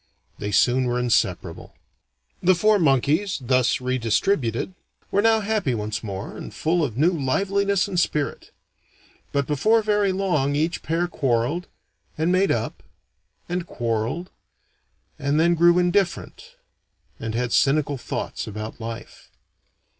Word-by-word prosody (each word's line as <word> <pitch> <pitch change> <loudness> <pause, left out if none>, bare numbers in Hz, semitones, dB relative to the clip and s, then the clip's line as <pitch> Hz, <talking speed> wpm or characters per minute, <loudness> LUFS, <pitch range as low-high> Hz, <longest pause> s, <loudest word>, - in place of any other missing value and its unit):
They 105 - -3
soon 125 +5 +3
were 120 0 0
inseparable. 125 -2 -1 0.7
The 185 +1 +4
four 210 +4 +3
monkeys, 155 +6 +2
thus 130 -1 +2
re 130 0 -1
distributed, 115 - 0 0.4
were 200 - +3
now 225 0 +4
happy 205 - 0
once 110 0 -4
more, 100 -2 -6
and - - -8
full 170 +1 0
of 120 -6 -3
new 160 +6 +4
liveliness 195 +7 +1
and 185 -3 -1
spirit. 150 -4 -1 0.8
But 140 -1 0
before 215 - +2
very 205 -2 +2
long, 175 -8 0
each 160 +4 0
pair 170 +2 -1
quarreled 135 +3 -1 0.5
and 160 +3 +1
made 190 +2 +3
up - - -2 0.7
and 175 0 -3
quarreled 120 +9 -2 0.9
and 145 +1 +1
then 170 +2 +4
grew 170 +1 +5
indifferent, 195 - -1 0.6
and 110 0 -4
had 120 0 -1
cynical 140 -1 +2
thoughts 110 - -4
about 110 +2 -7
life. 115 0 -8
155 Hz, 130 wpm, -23 LUFS, 125-185 Hz, 0.9 s, grew